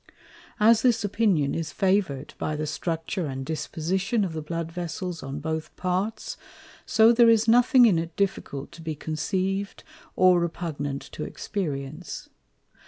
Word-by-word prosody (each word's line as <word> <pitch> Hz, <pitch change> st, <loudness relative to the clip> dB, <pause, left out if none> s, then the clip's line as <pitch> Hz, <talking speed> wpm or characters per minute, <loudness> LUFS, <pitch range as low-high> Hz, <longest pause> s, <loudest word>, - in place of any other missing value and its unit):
As 220 Hz, +1 st, +6 dB
this 240 Hz, -3 st, +3 dB
Opinion 195 Hz, -9 st, +1 dB
is 165 Hz, -1 st, -3 dB
Favour'd 185 Hz, -8 st, 0 dB
by 155 Hz, -, -1 dB
the 155 Hz, +1 st, -2 dB
Structure 165 Hz, +2 st, -3 dB
and 135 Hz, -1 st, -5 dB
Disposition 185 Hz, -, -1 dB
of 175 Hz, -, -5 dB
the 160 Hz, -, -4 dB
Blood 165 Hz, +1 st, -4 dB
Vessels 175 Hz, 0 st, -4 dB
on 135 Hz, +1 st, -5 dB
both 160 Hz, +1 st, -4 dB
Parts, 185 Hz, +4 st, -2 dB, 0.5 s
so 225 Hz, +1 st, +6 dB
there 235 Hz, 0 st, +6 dB
is 225 Hz, 0 st, +4 dB
nothing 245 Hz, +2 st, +6 dB
in 190 Hz, -8 st, +4 dB
it 165 Hz, 0 st, -5 dB
difficult 165 Hz, -8 st, -2 dB
to 170 Hz, -1 st, -12 dB
be 160 Hz, -1 st, -4 dB
conceiv'd, 190 Hz, +6 st, -2 dB, 0.3 s
or 185 Hz, -1 st, +5 dB
repugnant 155 Hz, -5 st, -3 dB
to 150 Hz, -, -5 dB
Experience. 150 Hz, -5 st, -5 dB
175 Hz, 145 wpm, -26 LUFS, 155-200 Hz, 0.5 s, As